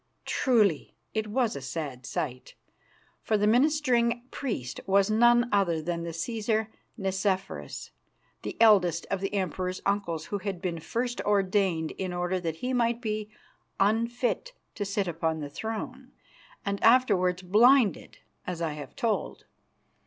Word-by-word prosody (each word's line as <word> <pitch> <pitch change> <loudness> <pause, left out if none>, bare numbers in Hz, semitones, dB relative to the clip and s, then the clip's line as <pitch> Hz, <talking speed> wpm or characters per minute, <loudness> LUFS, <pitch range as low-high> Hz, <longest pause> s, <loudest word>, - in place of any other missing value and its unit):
Truly 210 - +2 0.2
it 220 -1 -1
was 230 - 0
a 140 - -5
sad 130 -2 -5
sight, 125 0 -4 0.7
for 215 - +1
the 205 - +1
ministering 240 -1 +3
priest 205 - -4
was 195 +1 +3
none 240 +2 +5
other 190 -5 +2
than 170 +2 -3
the 170 - -4
Cæsar 220 +5 -1 0.3
Nicephorus, 195 -1 -2 0.5
the - - -6
eldest 185 -7 +5
of 195 -1 -1
the 195 - -2
Emperor's 185 -1 -2
uncles, 190 -6 -1
who 205 - -3
had 195 -2 -4
been 175 -2 -3
first 240 +8 -2
ordained 190 -5 +1
in 185 -2 -2
order 180 +1 -1
that 165 -3 -3
he 255 - 0
might 235 -1 +1
be 215 -3 -3 0.5
unfit 235 - 0 0.2
to 205 - -3
sit 200 -1 -1
upon 160 -1 -1
the 145 -1 -6
throne, 250 - -5 0.5
and 200 0 -2
afterwards 195 -7 +4
blinded, 225 +4 +4 0.3
as 180 -2 -3
I 165 -2 -1
have 145 -3 -9
told. 225 -2 -2
200 Hz, 140 wpm, -28 LUFS, 175-230 Hz, 0.7 s, none